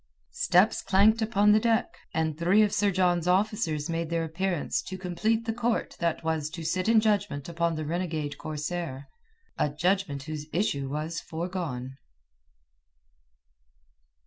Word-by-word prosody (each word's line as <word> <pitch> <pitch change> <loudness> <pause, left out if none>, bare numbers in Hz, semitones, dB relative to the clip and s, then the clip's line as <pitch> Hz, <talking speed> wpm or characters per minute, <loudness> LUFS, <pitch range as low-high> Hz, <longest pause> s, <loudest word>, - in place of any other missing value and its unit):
Steps 180 +5 +3
clanked 210 +4 +4
upon 210 -2 +3
the 215 - +6
deck, 230 +1 +1 0.2
and 160 -1 -1
three 180 +7 +4
of 205 - +1
Sir 205 - +2
John's 175 -2 +1
officers 180 -5 +1
made 165 -1 -2
their 165 -1 0
appearance 170 +1 -1
to 190 - -7
complete 215 +5 -1
the 225 - -1
court 240 0 -1
that 170 -1 -1
was 160 -2 -1
to 165 +1 -7
sit 185 +5 0
in 230 -1 +6
judgment 205 -10 0
upon 170 0 -1
the 155 0 -4
renegade 160 -3 -3
corsair, 155 -2 -4 0.5
a 150 - +2
judgment 160 -2 0
whose 150 0 -6
issue 140 -7 0
was 155 +3 -3
foregone. 160 -7 -5
175 Hz, 145 wpm, -28 LUFS, 155-200 Hz, 0.5 s, the